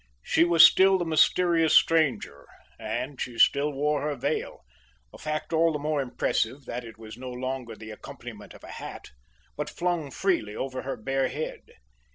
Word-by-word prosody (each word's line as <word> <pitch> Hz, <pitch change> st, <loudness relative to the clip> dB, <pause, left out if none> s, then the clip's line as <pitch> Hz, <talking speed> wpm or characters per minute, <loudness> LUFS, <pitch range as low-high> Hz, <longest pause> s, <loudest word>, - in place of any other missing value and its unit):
She -, -, +3 dB
was 170 Hz, -1 st, +8 dB
still 190 Hz, +2 st, +5 dB
the 175 Hz, -, -2 dB
mysterious 165 Hz, 0 st, +3 dB
stranger, 130 Hz, -, +2 dB, 0.3 s
and 125 Hz, +5 st, -4 dB
she 120 Hz, -2 st, -5 dB
still 140 Hz, +5 st, +4 dB
wore 145 Hz, +1 st, 0 dB
her 150 Hz, 0 st, -2 dB
veil 130 Hz, -, -3 dB, 0.5 s
a -, -, -13 dB
fact 155 Hz, +2 st, -4 dB
all 165 Hz, +1 st, +3 dB
the 150 Hz, -, -2 dB
more 150 Hz, 0 st, -1 dB
impressive 130 Hz, 0 st, -2 dB
that 125 Hz, +1 st, -5 dB
it 115 Hz, -2 st, -11 dB
was 110 Hz, 0 st, -11 dB
no 130 Hz, 0 st, -6 dB
longer 125 Hz, -2 st, -5 dB
the 110 Hz, 0 st, -10 dB
accompaniment 105 Hz, -, -10 dB
of -, -, -16 dB
a -, -, -10 dB
hat, -, -, -9 dB, 0.4 s
but -, -, -4 dB
flung 175 Hz, -4 st, -2 dB
freely 135 Hz, -, -1 dB
over 130 Hz, -1 st, -4 dB
her 135 Hz, -, -5 dB
bare 135 Hz, +4 st, -1 dB
head. 150 Hz, +4 st, -6 dB
140 Hz, 175 wpm, -26 LUFS, 125-160 Hz, 0.5 s, was